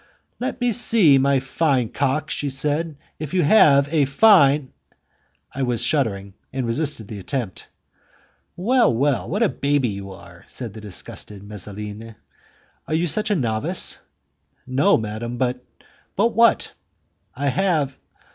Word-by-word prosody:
"Let 250 +2 -4
me 245 -1 +1
see, 205 - +5
my 140 0 +2
fine 135 -2 0
cock," 140 +4 -1
she 145 - -2
said, 150 +3 -2 0.2
"if 155 +2 -5
you 180 - +3
have 145 -5 +5
a 150 -3 +3
fine.. 140 -4 +4 0.4
." - - -34
I 135 - -5
was 125 -3 0
shuddering, 100 -9 -1 0.2
and 130 -1 -3
resisted 120 -2 -2
the 105 -1 -8
attempt. 110 0 -5 0.9
"Well, 235 +6 +2
well! 120 -5 0
What 205 +7 0
a - - +4
baby 140 -3 0
you 100 -1 -7
are!" 95 - -14
said 120 -5 -7
the 110 - -10
disgusting 100 0 -7
Messaline; 105 +2 -7 0.7
"are 155 - -1
you 165 +2 +1
such 210 +7 +1
a 205 - +2
novice?" 110 - 0 0.7
"No, 135 +10 +3
madam; 110 +2 -5
but...." 125 0 -2 0.5
"But 220 +4 +2
what?" 235 0 +3 0.6
"I 140 +2 -1
have...." 155 -5 0
135 Hz, 145 wpm, -21 LUFS, 115-160 Hz, 0.9 s, see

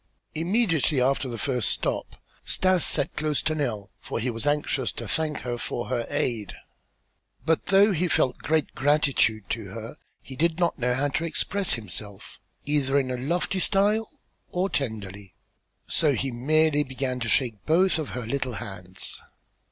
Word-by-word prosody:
Immediately 165 - +1
after 135 +1 +2
the 120 - -4
first 125 -4 0
stop - - -2 0.3
Stas 185 -2 +2
sat - - +2
close 150 -1 0
to 155 - +1
Nell 115 -10 -2
for - - -4
he 125 +2 -1
was 115 +5 -4
anxious 145 -3 +1
to - - -6
thank 155 -1 +2
her 120 -1 -3
for 120 - -3
her 120 -2 -1
aid. 110 -5 -1 0.9
But 160 0 +1
though 200 +2 +6
he 180 0 +1
felt 130 -6 +1
great 155 0 0
gratitude 135 -7 +2
to 110 -2 -2
her 115 +8 -8 0.3
he 130 - -9
did 165 +4 +1
not 175 -4 +1
know 125 0 +1
how 145 +2 +1
to 165 - -1
express 190 +4 0
himself, 105 -2 -7 0.3
either 140 -2 +1
in 130 -2 +1
a - - -1
lofty 170 +8 -1
style 210 +4 +2 0.4
or 185 +2 -1
tenderly; 100 - -4 0.5
so 150 -3 +2
he 135 +3 -1
merely 150 +5 +2
began 130 -1 -3
to 115 -2 -2
shake 115 -2 +1
both 175 +2 +4
of 155 - -3
her 125 - -4
little 130 +1 -2
hands. 95 -4 -5
135 Hz, 165 wpm, -26 LUFS, 120-160 Hz, 0.9 s, though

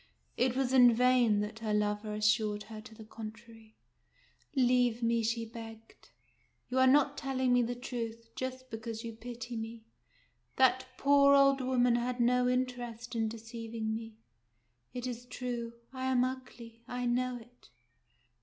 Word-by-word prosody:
It 255 0 +1
was 265 -1 0
in 245 -3 +7
vain 245 -4 +4
that 215 +2 -5
her 215 -2 -1
lover 210 0 -1
assured 210 0 +1
her 220 -1 -9
to 220 0 -13
the 220 - -11
contrary. 220 0 -11 0.4
" - - -34
Leave 245 -2 +3
me," 230 0 +2
she 230 +1 -1
begged: 225 -1 -11 0.3
" - - -41
you 255 +1 +1
are 260 - +6
not 285 +1 +4
telling 260 -2 0
me 245 - +5
the 240 +1 -1
truth, 230 -2 -6
just 260 0 -5
because 225 0 -5
you 230 -1 -6
pity 240 +1 -7
me. 225 0 -6 0.7
That 260 0 +3
poor 280 0 +5
old 275 -1 +5
woman 250 -2 +3
had 245 +1 -2
no 250 +1 +3
interest 245 -2 -3
in 225 -1 +1
deceiving 225 0 -5
me. 225 0 -6 0.8
It 250 0 -5
is 245 -1 -5
true. 240 -2 -4 0.2
I 260 0 -4
am 255 -1 +3
ugly. 250 -3 -6
I 245 -1 -3
know 250 +1 0
it." 240 +1 -17
240 Hz, 160 wpm, -32 LUFS, 225-255 Hz, 0.8 s, in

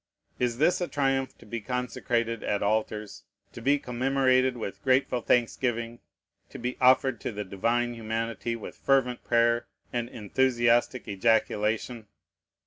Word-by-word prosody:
Is 120 -1 0
this 165 +6 +2
a 175 - 0
triumph 135 -3 0
to - - -16
be 115 +2 -5
consecrated 120 -1 -2
at 100 -1 -1
altars, 105 -1 -1 0.3
to - - -9
be 140 +2 +3
commemorated 130 0 +1
with 100 -3 -6
grateful 130 -1 +2
thanksgiving, 120 -1 0 0.5
to - - -9
be 125 +1 -3
offered 130 -1 +4
to - - -3
the 105 -1 -4
Divine 120 +5 0
Humanity 115 +1 -3
with 115 - -8
fervent 130 -3 +1
prayer 120 0 +2 0.3
and 120 -1 -2
enthusiastic 120 +2 +1
ejaculation? 110 +2 0
120 Hz, 135 wpm, -27 LUFS, 115-130 Hz, 0.5 s, offered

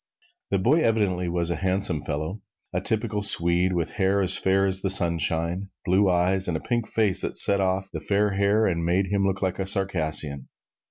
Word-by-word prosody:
The - - 0
boy 130 - +1
evidently 100 - -1
was 85 0 -2
a - - -3
handsome 95 -4 -1
fellow, 80 +8 -5 0.3
a 90 - -2
typical 105 0 -2
Swede, 90 -1 +4
with 85 -2 -3
hair 100 0 -1
as 95 -2 +5
fair 95 +1 0
as 95 -1 -1
the 95 - -2
sunshine, 85 0 0 0.2
blue 95 +1 +1
eyes, 90 +2 +1
and 85 -2 -2
a - - -8
pink 120 +3 -3
face 100 -4 +1
that - - -5
set 100 -1 +5
off 95 0 -2
the - - -5
fair 105 +1 -1
hair 100 +3 0
and 85 -4 -2
made 90 +3 -1
him 100 -1 0
look 95 +1 -3
like 95 0 -3
a 95 - -3
Circassian. 80 -8 +2
95 Hz, 200 wpm, -23 LUFS, 85-100 Hz, 0.3 s, as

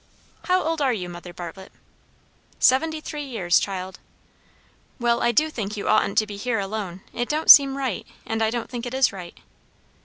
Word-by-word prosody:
"How 370 0 +2
old 320 0 -2
are 270 -2 +2
you, 185 -7 -4
Mother 175 0 -9
Bartlett?" 175 +2 -9 0.9
"Seventy 315 +4 +2
three 300 -1 -6
years, 205 -10 +1
child." 190 -2 -5 1.0
"Well, 235 -1 +1
I 240 - +3
do 310 +7 +2
think 215 -5 -5
you 200 - -4
oughtn't 200 - +2
to 215 - +4
be 205 -1 -8
here 230 +2 -1
alone. 195 -2 -4
It 240 0 -3
don't 310 +2 +6
seem 275 -1 +7
right, 260 -8 -3 0.2
and 225 0 -3
I 220 - +2
don't 235 0 -3
think 245 -1 -6
it 245 - -5
is 265 -4 +3
right." 180 -3 -9
225 Hz, 185 wpm, -23 LUFS, 195-270 Hz, 1.0 s, seem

